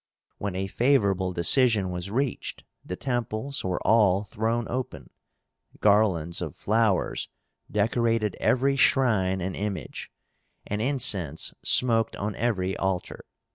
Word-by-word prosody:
When 100 -2 -4
a 95 +1 -2
favorable 100 -5 +1
decision 100 +2 +3
was 90 +2 -5
reached, 130 +4 -2 0.2
the 90 - -5
temples 120 +3 -3
were 90 -1 -2
all 105 -3 +4
thrown 115 +3 -2
open, 100 - -5 0.7
garlands 95 -6 +2
of 80 -5 -5
flowers 110 -2 0 0.4
decorated 115 -3 0
every 135 +2 +2
shrine 105 -9 +2
and 95 +1 -3
image, 100 -7 -5 0.5
and 105 +1 -3
incense 105 - +2
smoked 115 -3 +2
on 105 +1 -3
every 95 -6 -1
altar. 95 -2 -3
105 Hz, 115 wpm, -26 LUFS, 95-120 Hz, 0.7 s, all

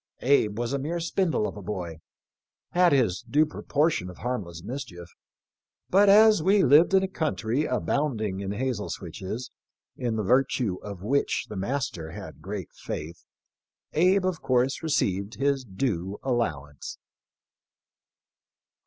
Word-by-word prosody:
Abe 115 -6 +3
was 120 +2 -2
a 140 - 0
mere 165 +5 -2
spindle 170 - 0
of - - -7
a 105 - -8
boy, 90 -5 -5 0.7
had 180 0 +4
his 115 -10 +2
due 145 +6 +2
proportion 150 - 0
of 90 - -11
harmless 95 -9 -4
mis 130 +7 -4
chief, 85 -2 -11 0.8
but 200 +2 +6
as 215 -1 +7
we 195 +4 +4
lived 155 +8 +6
in 190 - +5
a - - 0
country 150 -6 -1
abounding 120 -7 -1
in 100 0 -3
hazel 120 -1 -2
switches, 95 +8 -6 0.4
in 120 -3 -2
the 110 - -1
virtue 125 -3 +2
of 100 -3 -8
which 140 +6 +1
the 105 - -6
master 95 - -3
had - - -9
great 95 0 -6
faith, 80 +3 -7 0.7
Abe 185 +4 +3
of 185 -3 -1
course 130 +1 +1
received 100 - 0
his 140 -1 +1
due 95 -3 -2
allowance." 75 - -2
125 Hz, 140 wpm, -27 LUFS, 95-150 Hz, 0.8 s, as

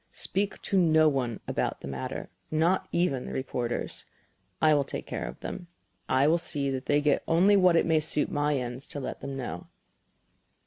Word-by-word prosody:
Speak 195 0 -2
to 195 - +2
no 160 -2 +5
one 125 -6 -1
about - - -2
the - - -7
matter, 65 -1 -5 0.2
not 165 +4 +2
even 155 -7 0
the - - -6
reporters. 125 -2 -3 0.5
I 155 -1 +5
will 145 -1 +3
take - - -6
care - - -4
of - - -8
them; 175 -2 -6 0.4
I 130 +2 +4
will 165 +3 +4
see 145 -5 -2
that 130 0 -4
they 145 0 +3
get 145 -1 +2
only 185 +5 +5
what 185 -3 +5
it - - +4
may 160 -1 +3
suit 150 -1 +1
my 145 0 +1
ends 125 +1 -4
to 145 - -6
let 135 - -5
them 140 0 -5
know." 90 -10 -5
145 Hz, 190 wpm, -28 LUFS, 130-170 Hz, 0.5 s, no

